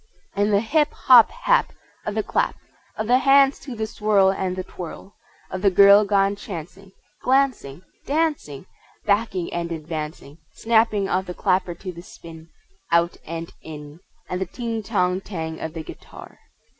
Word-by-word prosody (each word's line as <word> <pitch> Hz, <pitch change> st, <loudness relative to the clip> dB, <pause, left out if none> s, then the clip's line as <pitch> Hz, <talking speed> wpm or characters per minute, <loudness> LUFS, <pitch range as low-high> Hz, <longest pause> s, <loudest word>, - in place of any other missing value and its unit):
And 205 Hz, +1 st, +1 dB
the 200 Hz, 0 st, +3 dB
hip! 300 Hz, +6 st, +1 dB
hop! 245 Hz, -3 st, +6 dB
hap! -, -, +1 dB, 0.3 s
Of 210 Hz, -, -2 dB
the 215 Hz, -, 0 dB
clap 470 Hz, -, 0 dB, 0.4 s
Of 215 Hz, -, -2 dB
the 250 Hz, +3 st, +4 dB
hands 275 Hz, 0 st, +4 dB
to 260 Hz, -4 st, -8 dB
the 220 Hz, -1 st, -2 dB
swirl 210 Hz, -3 st, +2 dB
and 190 Hz, -1 st, -2 dB
the 185 Hz, -, -4 dB
twirl 185 Hz, +2 st, -9 dB, 0.4 s
Of 185 Hz, -, -4 dB
the 200 Hz, -, +4 dB
girl 200 Hz, +2 st, +7 dB
gone 200 Hz, 0 st, +2 dB
chancing, 190 Hz, -1 st, -9 dB, 0.3 s
Glancing, 255 Hz, -, 0 dB, 0.2 s
Dancing, 290 Hz, -, -1 dB, 0.4 s
Backing 200 Hz, -4 st, 0 dB
and 170 Hz, 0 st, -3 dB
advancing, 155 Hz, -1 st, -6 dB, 0.2 s
Snapping 220 Hz, -3 st, +2 dB
of 190 Hz, 0 st, -1 dB
the 180 Hz, -, -6 dB
clapper 185 Hz, -3 st, 0 dB
to 185 Hz, +2 st, -7 dB
the 170 Hz, -1 st, -11 dB
spin 165 Hz, -2 st, -13 dB, 0.4 s
Out 170 Hz, +1 st, +2 dB
and 165 Hz, +1 st, -6 dB
in 150 Hz, 0 st, -10 dB, 0.3 s
And 180 Hz, +1 st, -4 dB
the 190 Hz, -, -2 dB
ting, 230 Hz, +2 st, -4 dB
tong, 190 Hz, -3 st, 0 dB
tang 160 Hz, -5 st, -6 dB
of 160 Hz, +1 st, -6 dB
the 160 Hz, -, -5 dB
guitar! -, -, -12 dB
195 Hz, 160 wpm, -23 LUFS, 170-220 Hz, 0.4 s, girl